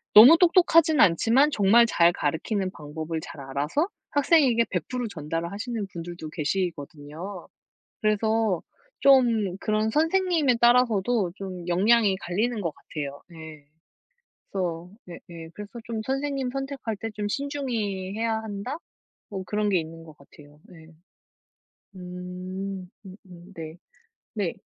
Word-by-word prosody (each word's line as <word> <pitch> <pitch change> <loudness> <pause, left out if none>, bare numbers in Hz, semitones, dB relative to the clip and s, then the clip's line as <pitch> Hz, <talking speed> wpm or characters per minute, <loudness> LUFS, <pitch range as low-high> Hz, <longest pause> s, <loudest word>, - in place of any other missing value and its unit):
너무 255 +10 +11
똑똑하진 335 -4 +5
않지만 235 - +4
정말 220 +1 +5
잘 170 -6 +4
가르치는 185 +5 -2
방법을 160 +1 -5
잘 145 - -9
알아서 145 - -1 0.2
학생에게 280 -6 +3
100% 235 +8 -3
전달을 165 -2 -4
하시는 220 +1 -4
분들도 170 -1 -7
계시거든요. 160 +2 -4 0.5
그래서 215 -3 +1 0.4
좀 230 -9 +4
그런 215 +1 0
선생님에 325 -3 +2
따라서도 235 -5 +3
좀 185 -3 -7
역량이 205 +3 +3
갈리는 210 +6 -2
것 165 - -2
같아요. 145 -2 -7
네. 160 -3 -12 0.9
그래서 175 -3 -3 0.2
네 175 - -9
예. 165 -1 -9
그래서 210 0 -9
좀 225 -2 -4
선생님 270 -1 -2
선택할 270 -5 -4
때 225 +3 -5
좀 205 -1 -2
신중히 225 -8 -3
해야 225 0 0
한다? 220 +6 -5 0.5
뭐 190 -2 -5
그런 210 +2 0
게 190 -3 +3
있는 165 0 -8
것 155 -2 -14
같아요. 145 +1 -18
네. 165 -3 -15 1.1
음 180 +1 -7 0.2
음 185 0 -10
음 180 +2 -14
네. 160 0 -7 0.6
네. 200 -6 -1
200 Hz, 260 characters per minute, -26 LUFS, 170-235 Hz, 1.1 s, 너무